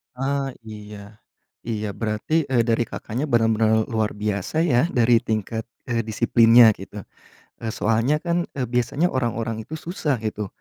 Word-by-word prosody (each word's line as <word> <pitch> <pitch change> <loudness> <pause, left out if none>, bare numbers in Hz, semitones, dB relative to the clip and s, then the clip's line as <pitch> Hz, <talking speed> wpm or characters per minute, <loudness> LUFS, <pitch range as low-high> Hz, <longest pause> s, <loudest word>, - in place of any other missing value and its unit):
Ah, 135 0 -2
iya, 105 -1 -11 0.5
iya. 105 -2 -2
Berarti 115 +10 -1
e 125 -3 +2
dari 115 0 +1
Kakaknya 125 +7 -4
benar-benar 110 -2 +3
luar 110 -2 -1
biasa 105 - -2
ya 150 0 +3
dari 120 -6 +3
tingkat, 110 -1 -3 0.2
eee, 115 -1 0
disiplinnya 115 +1 +6
gitu, 100 +1 -9 0.6
eee, 115 -1 -4
soalnya 115 +7 +1
kan 170 0 0
e 135 - -3
biasanya 125 +8 0
orang-orang 115 -3 -2
itu 160 - -10
susah 160 -4 -2
gitu, 105 -2 -3
115 Hz, 140 wpm, -23 LUFS, 110-130 Hz, 0.6 s, disiplinnya